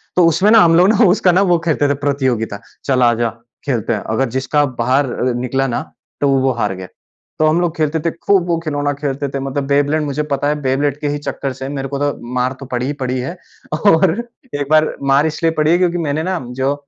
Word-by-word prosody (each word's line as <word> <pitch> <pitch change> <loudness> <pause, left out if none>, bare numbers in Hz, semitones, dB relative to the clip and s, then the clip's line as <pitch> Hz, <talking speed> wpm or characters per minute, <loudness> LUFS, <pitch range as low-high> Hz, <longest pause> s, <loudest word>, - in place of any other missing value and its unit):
तो 180 - +5
उसमें 190 +5 +3
ना 225 - +8
हम 165 -1 +5
लोग 180 +3 +5
ना 220 +1 +4
उसका 180 -1 +3
ना 185 - +3
वो 175 - +5
खेलते 150 -3 +2
थे 140 - +3
प्रतियोगिता 130 -7 -1 0.3
चल 130 -2 +1
आ 120 -1 +5
जा 115 - +2 0.4
खेलते 115 -4 -1
हैं। 105 - -2
अगर 130 +2 0
जिसका 135 +4 +1 0.2
बाहर 130 +2 +1
अ, 125 0 -1
निकला 130 +2 -1
ना 120 - -2 0.4
तो 145 - +3
वो 135 -1 +2
हार 115 -4 -1
गया। 95 0 -8 0.5
तो 155 - +4
हम 160 +3 +2
लोग 170 -1 -1
खेलते 155 0 0
थे, 165 +1 -1
खूब 185 +1 +1
वो 170 -1 +1
खिलौना 145 -2 -1
खेलते 140 0 -3
थे, 135 - -4
मतलब 135 +1 -3
बेब्लेड 145 +2 +2
मुझे 150 +1 -2
पता 140 +1 0
है 150 - +1
बेब्लेड 140 +2 0
के 150 - -1
ही 145 - -1
चक्कर 140 -2 -4
से 135 +1 -6
मेरे 135 -1 -4
को 140 +1 -4
तो 145 0 0 0.2
मार 125 +1 0
तो 135 - -8
पड़ी 125 +1 -1
ही 145 - -2
पड़ी 130 0 -1
है 135 +8 -5 0.5
और 180 -2 +5 0.4
एक 145 -1 -2
बार 155 0 +3 0.2
मार 140 +2 +4
इसलिए 165 +1 0
पड़ी 155 +1 +3
है 175 - +5
क्योंकि 175 -1 +1
मैंने 155 -1 -1
ना 185 0 -1 0.2
जो 135 +2 +2
145 Hz, 240 wpm, -17 LUFS, 130-160 Hz, 0.5 s, ना